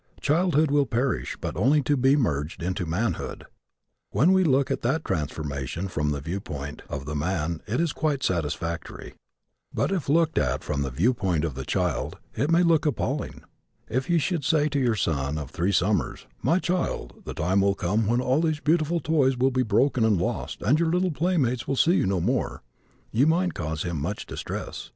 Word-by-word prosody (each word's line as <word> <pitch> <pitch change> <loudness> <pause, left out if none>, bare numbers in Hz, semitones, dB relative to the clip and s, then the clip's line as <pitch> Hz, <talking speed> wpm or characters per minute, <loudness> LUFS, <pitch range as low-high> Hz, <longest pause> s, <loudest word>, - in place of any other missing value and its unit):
Childhood 155 -1 +2
will 145 -2 +3
perish 125 +2 -1
but - - -4
only 135 - +3
to 145 - +2
be 135 +1 +4
merged 80 - -1
into 90 0 -2
manhood. 105 +8 -2 0.6
When 160 +8 +3
we 190 0 +4
look 140 -4 +2
at - - -1
that 135 +7 0
transformation 75 +2 -3
from 75 -5 -1
the 70 -1 -1
viewpoint 75 -3 -5
of 70 -2 -5
the 75 - -4
man 80 0 -1
it 110 +4 -1
is 170 -2 +1
quite 145 -4 -1
satisfactory. 85 -2 -3 0.6
But - - 0
if 180 -8 -2
looked 160 +1 +3
at 65 -2 0
from 70 -2 -2
the 70 - -1
viewpoint 90 - +1
of 75 - -3
the 65 0 -6
child - - -1 0.2
it 140 +7 0
may 170 +1 +4
look 160 -3 +3
appalling. 145 -1 -2 0.5
If 130 +8 -1
you 170 - +4
should 165 0 0
say 150 0 +2
to 140 0 0
your 120 -4 +2
son 75 -6 -1
of 75 -3 -6
three 90 +5 0
summers, 100 +2 0 0.2
"My 170 - +3
child, 180 -1 -2
the - - -6
time 95 +5 +2
will 100 0 +2
come 100 +4 0
when 120 +3 +2
all 130 +4 +2
these 155 -2 0
beautiful 160 +2 +1
toys 135 -5 +2
will 130 +2 +3
be 130 0 +1
broken 125 +2 +2
and 110 -5 +3
lost 90 - -3
and 145 +5 +3
your 170 -1 +2
little 180 +1 +1
playmates 145 -7 0
will 135 - 0
see 165 +6 +4
you - - +1
no 95 -1 +1
more," - - -1 0.5
you 125 +7 +3
might 175 +3 +2
cause 80 -2 -3
him 85 -5 -3
much 95 +8 -3
distress. - - -6
120 Hz, 195 wpm, -26 LUFS, -, 0.6 s, be